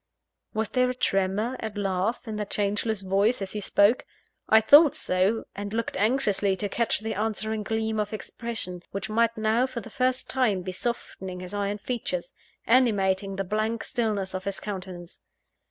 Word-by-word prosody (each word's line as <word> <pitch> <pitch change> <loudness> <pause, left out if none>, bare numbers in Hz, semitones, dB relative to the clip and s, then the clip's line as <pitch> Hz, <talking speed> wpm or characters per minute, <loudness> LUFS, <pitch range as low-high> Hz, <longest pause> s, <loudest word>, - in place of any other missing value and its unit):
Was 220 0 0
there 255 -1 +2
a 255 - -2
tremor 200 +3 0
at 220 -2 -5
last 195 +4 -1
in 220 - -4
that 210 -1 -3
changeless 205 0 0
voice, 200 +6 +2
as 195 -1 -4
he 210 - -4
spoke? 205 +4 +4 0.5
I 220 - +8
thought 290 +6 +7
so; 195 -2 +1
and 205 +1 -5
looked 230 0 -2
anxiously 205 -3 +2
to 205 +2 -2
catch 230 +1 0
the 220 0 -2
answering 215 +1 -2
gleam 220 +1 -1
of 210 -1 -1
expression, 215 -4 -5
which 200 +2 -5
might 230 +1 +2
now, 220 +4 +2
for 255 - -5
the 225 - -10
first 255 +2 0
time, 220 -8 +1
be 185 - -4
softening 185 -3 -4
his 185 +2 -7
iron 205 0 -1
features, 195 -6 -3 0.3
animating 200 -5 +3
the 195 - -1
blank 215 +4 -1
stillness 210 -6 -1
of 185 0 -4
his 200 -1 -2
countenance. 185 -4 -7
210 Hz, 170 wpm, -26 LUFS, 195-230 Hz, 0.5 s, I